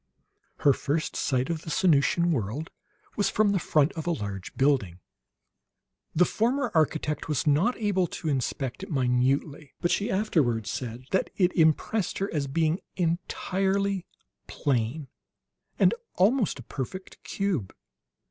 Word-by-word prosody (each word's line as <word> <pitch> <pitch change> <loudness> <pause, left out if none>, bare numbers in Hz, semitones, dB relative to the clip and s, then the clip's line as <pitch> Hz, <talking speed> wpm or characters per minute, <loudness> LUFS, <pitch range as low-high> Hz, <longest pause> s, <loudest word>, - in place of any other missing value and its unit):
Her 140 - +6
first 150 +4 -2
sight 130 +2 0
of 160 -2 -3
the 165 - -8
Sanusian 170 +1 +3
world 130 +3 -2 0.4
was 205 -2 +1
from 210 0 +2
the 195 - +1
front 155 -2 +2
of 160 0 -6
a - - +2
large 100 - -5
building. 130 -11 +1 1.2
The 180 +3 +5
former 245 +6 0
architect 155 -2 0
was 150 -4 -1
not 155 - +3
able 200 -5 +1
to 160 - -6
inspect 135 -1 -2
it 195 - -7
minutely; 135 +2 0
but 175 - 0
she 205 +4 +1
afterwards 140 - +1
said 125 0 -5
that 190 - +1
it 180 -2 +3
impressed 165 +5 +2
her 195 +1 -2
as 145 -3 -1
being 160 +4 +1 0.2
entirely 190 +2 -1 0.4
plain, 135 +1 -1 0.7
and - - +5 0.2
almost 210 - +2
a 125 - -9
perfect 145 +11 -7
cube. 180 - -2
160 Hz, 140 wpm, -27 LUFS, 135-190 Hz, 1.2 s, Her